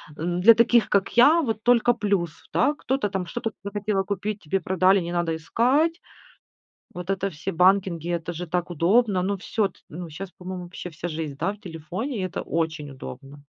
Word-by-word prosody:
н 175 +2 -2
для 230 +5 +9
таких, 235 0 +4
как 200 -1 +2
я, 300 +8 +7
вот 225 -6 -2
только 240 0 +4
плюс, 200 -7 0 0.2
да. 285 +4 +3
Кто-то 265 -7 -1
там 190 -2 -2
что-то 225 +6 -4
захотела 205 -1 -1
купить, 200 +2 -3
тебе 190 +5 0
продали, 190 +2 +3
не 170 0 -4
надо 175 -2 0
искать. 265 - +1 0.9
Вот 180 +1 -6
это 195 0 0
все 165 +5 -5
банкинги, 180 -1 +3
это 170 -1 -2
же 175 +1 -6
так 175 +1 -1
удобно. 185 +4 +3
Ну 200 +2 0
всё, 200 +1 0
т - - -23
ну, 170 +2 -7
щас, 180 +4 -7
по-моему, 180 0 -7
вообще 180 0 -8
вся 165 +2 -6
жизнь, 155 -3 -4
да, 195 - 0
в 210 - -15
телефоне. 180 - -5
И - - -2
это 180 - -5
очень 160 -3 -2
удобно. 135 - -10
185 Hz, 190 wpm, -25 LUFS, 170-210 Hz, 0.9 s, для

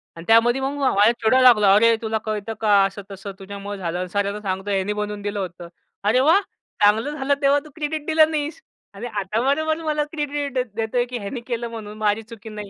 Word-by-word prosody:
आणि 165 0 -10
त्यामध्ये 235 +3 +4
मग 270 +1 -1
माझ्यावर 225 -5 +4
चिडाय 255 +4 +4
लागला, 210 -6 +6
"अरे 230 +2 +5
तुला 220 0 -1
कळतं 215 0 -3
का, 215 - +1 0.2
असं-तसं, 195 0 -7
तुझ्यामुळं 200 +1 -7
झालं 175 -1 -3
आणि 185 - -4
सरांना 205 +2 -1
सांगतो 195 0 -3
ह्यानी 195 +1 0
बनवून 210 0 -4
दिलं 205 0 -3
होतं." 175 -2 -6 0.4
अरे 220 +5 +3
वाह! 320 +9 +5 0.4
चांगलं 220 +7 +3
झालं 275 +1 +1
तेव्हा 280 +1 +4
तू 305 - -12
क्रेडिट 310 -1 -3
दिलं 315 0 +4
नाहीस. 305 +7 -3 0.3
आणि, 210 +5 -6
आता 210 0 -2
बरोबर 315 +3 +1
मला 300 -1 0
क्रेडिट 290 -2 -3
दे 255 -1 +1
देतोय 230 +2 0
की 245 0 -5
ह्यानी 230 +4 -6
केलं 235 -1 -3
म्हणून 215 -2 -8
माझी 215 0 +1
चुकी 220 0 -11
नाही. 210 -1 -8
220 Hz, 205 wpm, -22 LUFS, 205-270 Hz, 0.4 s, लागला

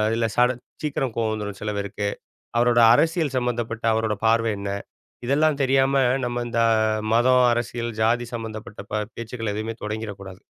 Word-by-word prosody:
இல்ல, 115 0 +1
சடன் 125 0 +2 0.2
சீக்கிரம் 135 -5 -1
கோவம் 110 -1 0
வந்துரும் 105 -2 -5
சில 105 0 -2
பேருக்கு. 100 0 -2 0.5
அவரோட 120 0 +4
அரசியல் 160 -2 +1
சம்மந்தப்பட்ட 120 -2 -2
அவரோட 110 -1 0
பார்வை 115 0 +3
என்ன? 100 0 -4 0.6
இதெல்லாம் 145 +2 +2
தெரியாம, 135 0 +3 0.2
நம்ம 120 0 -2
இந்த 115 0 +1 0.5
மதம், 125 +1 +5
அரசியல், 120 0 -3
ஜாதி 120 +2 +2
சம்பந்தப்பட்ட 110 -2 -7
ப 105 0 0
பேச்சுக்கள 115 -1 -4
எதுவுமே 110 +1 -3
தொடங்கிற 110 0 -4
கூடாது. 95 -1 -10
115 Hz, 150 wpm, -23 LUFS, 110-125 Hz, 0.6 s, மதம்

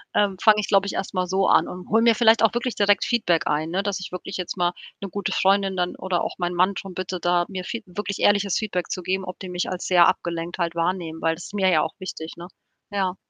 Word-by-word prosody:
ähm, 200 -2 +2
fange 215 -1 +6
ich, 210 - -2
glaube 195 -1 +3
ich, - - -3
erst 195 - -4
mal 185 -1 0
so 190 +2 +1
an - - +4
und 180 +1 -9
hole 225 +1 +4
mir 230 -1 +5
vielleicht 225 0 +5
auch 225 - +4
wirklich 240 0 -1
direkt 205 -1 +3
Feedback 175 -8 +1
ein, 155 +2 0
ne, 190 +4 -1
dass 200 -1 -2
ich 185 - -7 0.3
jetzt 180 +1 -5
mal 175 0 +1 0.3
'ne 200 - -5
gute 200 0 -3
Freundin 195 0 +2
dann 180 -1 -1
oder 185 -2 -1
auch - - -3
mein 175 -1 -2
Mann 185 +3 +3
drum 195 -1 -7
bitte 185 0 -4
da 175 0 +2
mir 190 -2 -5
Fee 230 - -5
wirklich 200 +2 -5
ehrliches 200 -2 +3
Feedback 190 -5 -3
zu 185 - -3
geben, 190 +2 -1
ob 180 0 -7
die 185 - -7
mich 180 0 -2
als 185 -1 -4
sehr 175 -2 +6
abgelenkt 170 -2 -2
halt 170 -1 -1
wahrnehmen, 170 -1 -2
weil 165 0 +1
das 170 - -10
ist - - -11
mir 195 -2 +2
ja 160 -4 +4
auch 160 - -2
wichtig, 165 -4 -7
ne? 170 +1 -8 0.4
Ja. 190 -2 -1
185 Hz, 260 wpm, -23 LUFS, 175-200 Hz, 0.4 s, fange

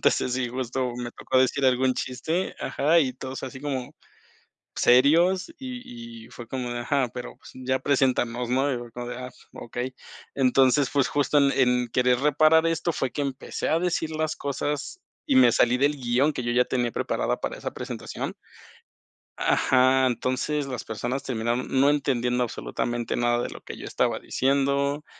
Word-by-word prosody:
entonces, 125 - +2
sí, 130 -1 -1
justo 125 0 -2
me 120 -1 -5
tocó 130 +2 -1
decir 130 +2 +2
algún 130 0 +3
chiste, 160 +10 -2
ajá, 160 +4 +2
y 130 -4 0
todos, 130 0 -7
así 130 0 -7
como 135 -4 -4 0.8
serios 165 - +4
y 120 - -8
y - - -17
fue 120 -1 -10
como 125 0 -4
de 120 0 -3
ajá, 130 +1 0
pero, 125 -1 -6
pues, - - -14
ya 130 0 -1
preséntanos, 125 -3 +1
¿no? 135 +3 +2
Y - - -1
fue 120 -1 -10
como 120 +1 -6
de: 125 - -5
"Ah, 125 0 -7 0.2
okey". 125 +2 -5 0.4
Entonces, 135 +1 +3
pues 140 -2 +2
justo, 145 0 +2
en 140 -1 +4
en 125 -2 +2
querer, 125 +1 +2
reparar 155 +3 +4
esto 165 +1 0
fue 135 -4 -2
que 145 - -2
empecé 135 -2 -3
a 160 - +3
decir 170 -2 -1
las 155 0 -2
cosas, 145 - -3 0.3
y 275 -4 +2
me 260 - +7
salí 125 +1 +3
del 145 +2 +2
guion 130 +3 +1
que 125 - -3
yo 120 0 -1
ya 125 +1 +3
tenía 120 -2 -1
preparado - - -1
para - - -3
esa - - -5
presentación - - -5 1.1
Ajá, 130 0 +3
entonces, 130 +4 -1
las 125 -3 -5
personas 120 +5 -3
terminaron, 120 0 -2
no 140 +2 +5
entendiendo 125 -4 0
absolutamente 120 0 -3
nada, 120 0 +1
de - - -4
lo - - -10
que - - -8
yo - - -8
estaba - - 0
diciendo, 140 +2 0
130 Hz, 175 wpm, -25 LUFS, 125-145 Hz, 1.1 s, me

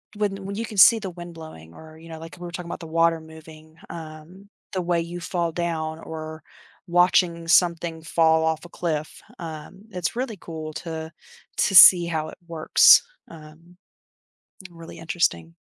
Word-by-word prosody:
when 200 -2 -3
when 200 +1 -6
you 225 +2 -4
can 215 -2 -10
see 225 +5 +7
the 200 -3 -6
wind 175 -1 -10
blowing 85 - -12
or, 160 - -14
you 165 +1 -15
know, 160 -1 -9
like, 165 +2 -11
we 175 - -8
were 175 - -8
talking 170 0 -7
about - - -6
the 165 - -10
water 165 +1 +1
moving, 160 0 -15
um, 165 +4 -11 0.2
the 185 - -2
way 170 -1 0
you 170 +1 -7
fall 170 -1 -3
down 160 -2 -4
or 160 -1 -9 0.4
watching 175 -1 +2
something 170 -1 +1
fall 160 0 +2
off 160 -1 -2
a - - -12
cliff, 155 -3 -5 0.2
um, 165 +3 -9
it's 180 0 -4
really 240 -3 -4
cool 155 -2 -8
to 160 0 -7 0.5
to 195 - +1
see 175 -1 +10
how 160 -2 -3
it - - -13
works, 165 -2 +5 0.3
um 165 +2 -16 0.9
really 165 -1 -13
interesting. 85 - -2
165 Hz, 170 wpm, -23 LUFS, 160-175 Hz, 0.9 s, see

